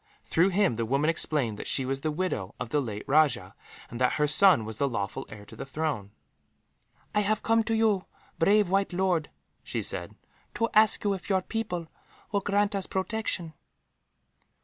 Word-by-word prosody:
Through 175 +4 +2
him, 195 -5 +2
the 115 - -1
woman 140 +6 +2
explained 135 -9 -1
that - - -6
she 135 - 0
was 135 +1 -2
the 155 - -1
widow 150 - -3
of - - -4
the 145 +4 +1
late 105 -5 -5
rajah, 150 +1 +2 0.4
and 120 +2 -6
that 125 - +3
her 150 - +2
son 150 - +6
was 110 -1 -7
the 140 - +1
lawful 100 -5 -4
heir 105 -1 -11
to - - -13
the - - -6
throne. 135 -7 -3 1.0
"I 210 - +3
have 210 +1 0
come 225 0 +3
to 225 - 0
you, 215 -4 +2 0.3
brave 205 +4 +4
white 195 +1 +1
lord," 180 -4 +1 0.3
she - - -4
said, - - -2 0.4
"to 230 - 0
ask 215 0 +4
you 205 -1 +2
if 190 - -7
your 190 -2 +2
people 180 -7 -3 0.4
will 200 -1 +1
grant 205 +1 +1
us 195 -1 -2
protection." 190 -4 -2
170 Hz, 185 wpm, -28 LUFS, 135-200 Hz, 1.0 s, son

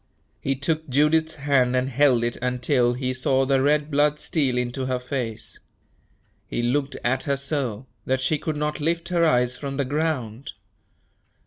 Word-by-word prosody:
He 135 - -1
took 155 +2 -2
Judith's 160 +4 +2
hand 140 -3 +2
and 130 +1 +1
held 135 -2 +3
it 120 0 -1
until 125 0 +1
he 130 +1 -2
saw 130 +1 +1
the 135 0 +2
red 150 +2 +2
blood 145 +1 +3
steal 135 -6 0
into 125 +2 -2
her 130 -1 0
face. 120 -4 -5 0.9
He 120 - -2
looked 135 +3 0
at 130 +5 0
her 140 -2 0
so, 135 -5 -3 0.2
that 130 0 +1
she 140 +4 0
could 155 - -3
not 150 +1 -2
lift 170 +3 -1
her 175 -2 +2
eyes 125 -5 +3
from 140 -1 -5
the 140 - 0
ground. 140 -3 -2
135 Hz, 165 wpm, -24 LUFS, 125-150 Hz, 0.9 s, held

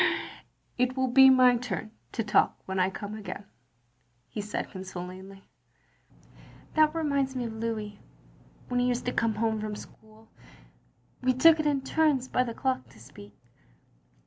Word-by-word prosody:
" - - -41
It 255 +1 -1
will 260 -1 +1
be 265 +2 +8
my 255 -2 +6
turn 220 -3 -5 0.2
to 225 - -1
talk 210 - +2
when 190 0 -3
I 185 +1 +3
come 205 +2 -7
again, 205 -1 -7 0.4
" 120 0 -42
he 210 - -3
said 210 +1 -4
consolingly. 190 +1 -8 1.3
"That 310 0 +4
reminds 280 -4 0
me 250 - -2
of 230 -1 -5
Louis; 220 -2 -4 0.7
when 245 0 0
he 245 - +2
used 245 0 -1
to 245 - -1
come 225 -2 0
home 220 0 0
from 215 -1 -4
school, 220 +1 -14 0.9
we 255 0 +2
took 320 +5 +6
it 305 - +1
in 285 -2 +1
turns 280 -2 +1
by 250 - +1
the 230 -2 -5
clock, 260 -1 -2
to - - -18
speak. 105 -4 -14
225 Hz, 165 wpm, -28 LUFS, 195-260 Hz, 1.3 s, be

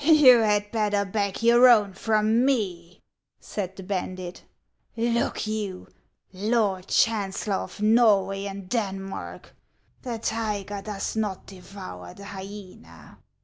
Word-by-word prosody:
"You 285 -6 +7
had 210 -2 +1
better 210 -2 +1
beg 200 +1 -2
your 240 +2 +7
own 210 -5 +4
from 220 +3 +2
me," 185 -10 -2 0.4
said 190 -2 -5
the 190 - -9
bandit. 185 -2 -5 0.3
" - - -42
Look 235 0 0
you, 210 -4 -4 0.4
Lord 200 -2 0
Chancellor 205 -2 +1
of 210 - -6
Norway 205 -3 +3
and 195 -1 -7
Denmark, 195 -3 -4 0.5
the 240 -3 -4
tiger 210 -3 -3
does 205 0 -4
not 210 -4 -2
devour 185 - -10
the 200 - -11
hyena. 190 - -11
205 Hz, 120 wpm, -25 LUFS, 190-225 Hz, 0.5 s, You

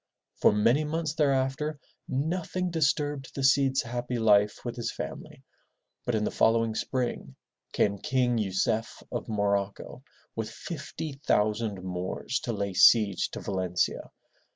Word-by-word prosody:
For - - +5
many 115 +8 +3
months 155 0 -2
thereafter, 140 0 0 0.3
nothing 175 +5 -2
disturbed 145 -4 0
the 135 - -3
Cid's 135 0 +4
happy 120 +1 -3
life 105 -1 +3
with 120 - -3
his 120 -2 -3
family, - - -7 0.6
but 120 - 0
in 105 - 0
the - - -1
following 115 0 +2
spring, 120 +2 -3 0.4
came 100 -1 +1
King 125 -1 +1
Yu 105 -3 -1
cef 110 +4 -1
of - - -4
Morocco 100 +2 -1 0.3
with 110 -1 -3
fifty 140 +2 -7
thousand 105 -2 +1
Moors 90 +7 -3
to 120 - -1
lay 100 -3 -2
siege 100 0 +5
to - - -7
Valencia. 95 -2 -1
120 Hz, 135 wpm, -28 LUFS, 105-140 Hz, 0.6 s, For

